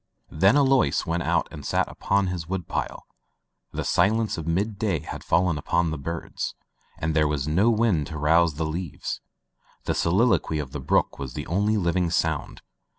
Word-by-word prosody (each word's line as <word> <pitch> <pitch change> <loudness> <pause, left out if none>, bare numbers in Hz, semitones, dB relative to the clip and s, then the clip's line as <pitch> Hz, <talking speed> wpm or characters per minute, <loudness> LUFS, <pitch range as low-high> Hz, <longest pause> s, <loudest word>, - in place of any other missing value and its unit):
Then 95 - +4
Alois 135 -2 +3
went 85 0 -1
out - - +1
and 75 - -9
sat - - 0
upon 100 0 0
his 90 -3 -4
wood 95 -3 -3
pile. - - -4 0.7
The - - -3
silence 110 +5 +2
of 80 -2 -6
mid 100 +5 -1
day 95 -9 0
had - - -7
fallen 85 -3 +2
upon 85 +3 0
the 80 - -3
birds, 85 +4 -4 0.4
and 80 0 -2
there 75 -1 +4
was 75 -2 -2
no 95 +9 +3
wind 105 -10 +2
to 75 - -6
rouse 80 +1 +3
the 80 +2 -2
leaves; 80 +1 -4 0.6
the - - 0
soliloquy 95 -2 +2
of 70 -4 -4
the 75 - -5
brook 65 - +1
was 65 -3 -6
the 75 - -4
only 105 +6 +1
living 90 -2 +1
sound. 80 -3 -1
85 Hz, 180 wpm, -25 LUFS, 75-100 Hz, 0.7 s, Then